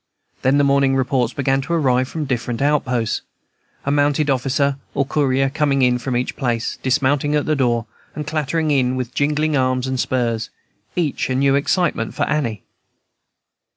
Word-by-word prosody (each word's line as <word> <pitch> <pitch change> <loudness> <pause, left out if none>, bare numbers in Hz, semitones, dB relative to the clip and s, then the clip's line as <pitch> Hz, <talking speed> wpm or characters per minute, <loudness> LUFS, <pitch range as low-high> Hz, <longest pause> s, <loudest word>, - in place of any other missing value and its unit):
Then 130 +2 +3
the 145 - +4
morning 140 -1 +3
reports 130 -2 +1
began 135 0 0
to 155 +5 -4
arrive 130 -5 +2
from 160 - -5
the 150 - -3
different 120 -2 -2
outposts, 130 -5 0 0.6
a 140 - 0
mounted 145 0 +2
officer 135 +2 +1 0.2
or 140 - +1
courier 135 -1 +1
coming 140 -1 +1
in 125 -1 +3
from 125 -1 -2
each 125 - -2
place, 120 -4 -2
dismounting 145 +2 +1
at 150 - +1
the 155 - +1
door, 120 -5 +1 0.3
and 150 - -4
clattering 155 +1 -1
in 130 -2 +2
with 125 -1 -4
jingling 150 +1 +1
arms 130 -1 +1
and 130 -1 -2
spurs, 115 -3 -1 0.5
each 160 -7 -1
a 130 - 0
new 135 +1 +3
excitement 175 +6 0
for 145 - 0
Annie. 135 -9 -1
135 Hz, 170 wpm, -20 LUFS, 130-145 Hz, 0.6 s, the